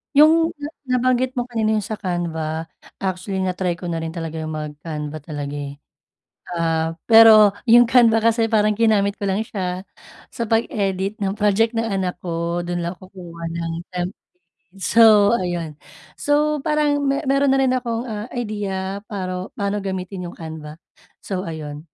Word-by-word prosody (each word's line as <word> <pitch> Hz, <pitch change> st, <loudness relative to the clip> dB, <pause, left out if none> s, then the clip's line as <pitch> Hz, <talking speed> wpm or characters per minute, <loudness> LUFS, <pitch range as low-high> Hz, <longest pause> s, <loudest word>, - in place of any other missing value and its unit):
Yung 305 Hz, +2 st, +8 dB, 0.3 s
na 290 Hz, 0 st, -5 dB, 0.3 s
nabanggit 255 Hz, +1 st, +1 dB
mo 245 Hz, -, 0 dB
kanina 225 Hz, -3 st, 0 dB
yung 210 Hz, -, 0 dB
sa 220 Hz, +1 st, -5 dB
Canva 165 Hz, -4 st, -3 dB, 0.3 s
actually 190 Hz, 0 st, -2 dB
na-try 180 Hz, -1 st, -1 dB
ko 180 Hz, -, -15 dB
na 165 Hz, -, -2 dB
rin 160 Hz, +1 st, -5 dB
talaga 165 Hz, -1 st, -5 dB
yung 155 Hz, 0 st, -4 dB
mag-Canva 150 Hz, 0 st, -6 dB
talaga, 145 Hz, -1 st, -6 dB
eh. 140 Hz, 0 st, -6 dB, 0.7 s
Ah, 165 Hz, -1 st, -1 dB
pero 220 Hz, -2 st, +8 dB, 0.2 s
yung 240 Hz, +1 st, +8 dB
Canva 230 Hz, -2 st, +4 dB
kasi 230 Hz, 0 st, +3 dB
parang 215 Hz, -1 st, +3 dB
ginamit 210 Hz, -2 st, +2 dB
ko 200 Hz, -, -2 dB
lang 195 Hz, +3 st, 0 dB
siya 185 Hz, -4 st, -4 dB, 0.5 s
sa 235 Hz, -, -3 dB
pag-edit 200 Hz, -3 st, -1 dB
ng 195 Hz, -1 st, -1 dB
project 215 Hz, +2 st, +2 dB
ng 225 Hz, -, +1 dB
anak 190 Hz, -5 st, -2 dB
ko 170 Hz, 0 st, -2 dB
dun 175 Hz, 0 st, -3 dB
lang 170 Hz, +1 st, -3 dB
kukuha 180 Hz, -2 st, -12 dB
ng 165 Hz, 0 st, -3 dB, 0.2 s
temp 180 Hz, 0 st, -2 dB, 0.7 s
so 215 Hz, +1 st, +6 dB
ayun. 175 Hz, -6 st, -3 dB, 0.4 s
So, 295 Hz, 0 st, +1 dB
parang 300 Hz, -2 st, +1 dB
me 275 Hz, 0 st, +1 dB
meron 275 Hz, 0 st, +3 dB
na 270 Hz, -, +3 dB
rin 260 Hz, -1 st, +2 dB
akong, 235 Hz, -1 st, -3 dB
ah, 215 Hz, +1 st, -6 dB
idea 200 Hz, -4 st, -4 dB
paro 185 Hz, -3 st, -5 dB
paano 200 Hz, 0 st, -2 dB
gamitin 185 Hz, -2 st, -5 dB
yung -, -, -15 dB
canva, 160 Hz, -1 st, -8 dB, 0.4 s
so 185 Hz, -2 st, -4 dB
ayun. 150 Hz, -3 st, -6 dB
195 Hz, 160 wpm, -21 LUFS, 170-225 Hz, 0.7 s, Yung